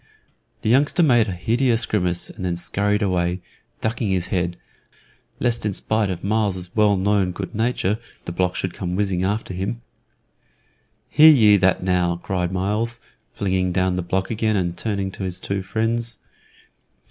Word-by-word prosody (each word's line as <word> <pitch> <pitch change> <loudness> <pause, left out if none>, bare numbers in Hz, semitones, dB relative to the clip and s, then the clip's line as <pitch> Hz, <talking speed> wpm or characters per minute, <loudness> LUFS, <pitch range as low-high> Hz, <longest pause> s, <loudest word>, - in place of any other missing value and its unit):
The - - 0
youngster 145 +7 +3
made 120 -7 +4
a - - -2
hideous 115 +6 +1
grimace, 90 -4 -1
and - - -9
then 90 -1 -1
scurried 105 +4 0
away, 90 -2 0 0.4
ducking 115 0 -1
his 95 -2 0
head, 90 -2 -1 0.8
lest 120 -1 0
in 105 -1 0
spite 110 +1 0
of 90 -2 -4
Myles's 100 -4 -1
well 105 -2 +4
known 95 -1 +1
good 95 +3 -6
nature 110 -2 0 0.3
the - - -4
block 90 +1 0
should 95 -2 -2
come 90 0 -4
whizzing 95 -2 0
after 100 0 -2
him. 105 +6 -4 1.2
"Hear 155 +1 +7
ye 110 -9 +7
that 95 -1 +2
now!" 90 -2 +1
cried 90 0 -2
Myles, 105 +5 -1 0.4
flinging 95 -2 0
down 95 0 +1
the 90 - -1
block 95 +3 -2
again 110 -1 0
and 90 -3 -1
turning 100 -2 -2
to 95 - -7
his 90 -1 -3
two 100 +1 -3
friends. 115 +4 -2
100 Hz, 160 wpm, -22 LUFS, 90-110 Hz, 1.2 s, Hear